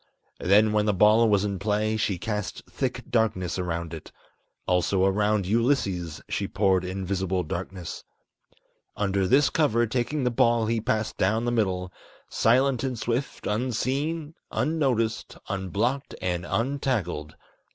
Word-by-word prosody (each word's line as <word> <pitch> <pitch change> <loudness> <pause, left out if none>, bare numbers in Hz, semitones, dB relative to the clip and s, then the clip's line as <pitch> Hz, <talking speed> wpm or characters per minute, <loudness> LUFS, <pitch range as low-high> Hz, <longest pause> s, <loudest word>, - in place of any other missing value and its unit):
Then 105 +4 +4
when 105 0 +2
the 105 - +2
ball 110 +4 +5
was 100 -1 +3
in 100 -2 -3
play, 105 +1 0
she 105 -3 0
cast 105 +1 -4
thick - - -3
darkness 100 -6 0
around 85 -2 -3
it. 80 - -9 0.5
Also 95 +1 +2
around 105 +1 +2
Ulysses 100 - 0
she - - -2
poured 95 -3 +2
invisible 95 0 -2
darkness. 90 +2 -6 0.9
Under 100 -2 +1
this 135 +7 +4
cover, 120 -7 +2
taking 125 +5 -1
the 125 - +1
ball 115 -1 +3
he 115 0 0
passed 110 0 -1
down 110 +5 +1
the 120 - +1
middle, 95 -6 -1 0.4
Silent 130 +2 +3
and 130 -3 -2
swift, 120 +4 -3
unseen, 135 +8 -1 0.2
unnoticed, 130 -7 0
unblocked, 105 +8 -2
and 90 -1 -2
untackled. 115 - -1
105 Hz, 130 wpm, -26 LUFS, 95-120 Hz, 0.9 s, ball